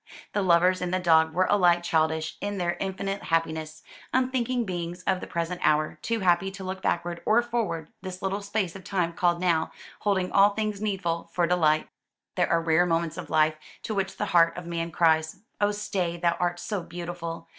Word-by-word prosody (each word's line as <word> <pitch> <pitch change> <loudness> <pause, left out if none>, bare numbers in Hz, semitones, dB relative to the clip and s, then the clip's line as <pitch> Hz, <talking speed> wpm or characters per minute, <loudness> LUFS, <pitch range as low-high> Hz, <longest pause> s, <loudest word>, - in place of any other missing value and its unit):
The 205 - +1
lovers 180 0 +4
and 180 -1 -2
the 185 - +2
dog 160 -2 +4
were 185 +3 +2
alike 175 -4 +4
childish 160 -1 0
in 205 0 -3
their 175 -1 0
infinite 195 +1 -3
happiness, 160 -1 -1 0.3
unthinking 255 -1 0
beings 175 -1 -5
of 185 0 +1
the - - -6
present 170 +1 -3
hour, 155 0 +2
too 230 -2 -1
happy 180 +1 +3
to 195 0 -9
look 190 0 -5
backward 175 0 -1
or 230 +2 +3
forward, 225 -10 -2
this 185 -1 -7
little 195 +1 -1
space 200 -3 -2
of 195 - -9
time 180 -4 -1
called 175 -2 +1
"now" 170 -3 +1 0.3
holding 190 -3 0
all 200 +1 +5
things 215 -2 -2
needful 175 -5 -2
for 175 - +2
delight. 160 -3 +2 0.5
These - - +2
are 170 0 +2
the - - -10
rare 165 +2 +4
moments 165 -1 0
of - - -7
life, 155 0 +3 0.3
to 220 - -3
which 195 -1 -2
the 210 - -1
heart 170 -1 +5
of 180 - -6
man 170 0 -3
cries, 160 +1 +2 0.2
"Oh 205 - +4
stay, 185 -4 -2
thou 170 0 +1
art 175 0 0
so 205 -1 -3
beautiful!" 170 -1 -6
175 Hz, 200 wpm, -26 LUFS, 165-195 Hz, 0.5 s, all